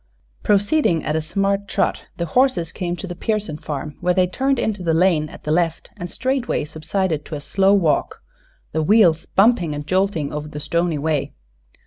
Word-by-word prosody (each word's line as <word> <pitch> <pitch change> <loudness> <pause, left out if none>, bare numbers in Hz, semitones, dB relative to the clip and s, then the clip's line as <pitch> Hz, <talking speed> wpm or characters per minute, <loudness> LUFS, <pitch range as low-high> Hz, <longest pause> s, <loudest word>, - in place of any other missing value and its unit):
Proceeding 205 - +2
at 150 - -1
a 160 - +1
smart 195 +5 -1
trot - - -1
the 170 - -1
horses 250 -11 +2
came 175 -1 -3
to 185 - -7
the 180 - -5
Pearson 200 -3 -2
farm, 150 -1 -6
where 180 0 +1
they 185 -1 +4
turned 265 +9 0
into 215 -4 -1
the 165 -2 +1
Jane 165 -5 +2
at - - -13
the 150 - -2
left 165 0 0
and 175 - -6
straightway 255 - -1
subsided 155 +1 -2
to 155 - -6
a - - -4
slow 195 +6 +3
walk, 190 - +1 0.5
the 160 - 0
wheels 170 -3 +4
bumping 195 -7 +3
and 145 0 -6
jolting 185 -4 0
over 150 0 -4
the 150 0 -7
stony 170 +1 0
way. 150 -1 -1
175 Hz, 185 wpm, -21 LUFS, 155-200 Hz, 0.5 s, they